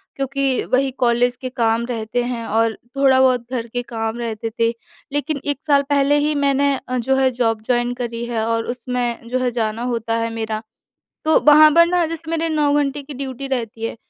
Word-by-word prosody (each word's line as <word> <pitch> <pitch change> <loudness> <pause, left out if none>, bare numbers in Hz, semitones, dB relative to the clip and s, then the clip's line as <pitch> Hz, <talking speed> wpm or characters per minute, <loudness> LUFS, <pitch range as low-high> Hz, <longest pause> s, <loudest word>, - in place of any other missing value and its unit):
क्योंकि 270 -1 -1
वही 265 +1 +3
कॉलेज 245 0 +2
के 255 - -4
काम 235 -2 0
रहते 235 0 -2
हैं 240 -2 -4
और 225 0 +1 0.2
थोड़ा 270 -1 +4
बहुत 255 -2 +4
घर 235 -3 -3
के 245 +1 -3
काम 225 -1 -4
रहते 225 -1 -3
थे। 230 0 +3 0.4
लेकिन 290 0 -1
1 285 -1 -2
साल 285 -2 +4
पहले 285 0 +3
ही 300 +1 +1
मैंने 280 0 +2
अ, 255 - -2
जो 265 +2 +1
है 265 -1 +3
जॉब 225 -3 0
जॉइन 245 0 +1
करी 235 -1 -4
है 230 -2 -2
और 230 0 0
उसमें 245 -2 -3
जो 255 +2 -1
है 250 -1 0
जाना 225 -1 -2
होता 230 0 -2
है 230 0 -1
मेरा। 220 -1 -3 0.6
तो 315 - +4
वहाँ 305 +1 +8
पर 335 0 +7
ना, 355 0 +2
जैसे 325 0 -6
मेरे 330 0 0
9 300 -2 +1
घंटे 290 0 0
की 285 0 -9
ड्यूटी 270 0 -5
रहती 230 -4 -3
है। 230 - -3
250 Hz, 205 wpm, -20 LUFS, 230-280 Hz, 0.6 s, वहाँ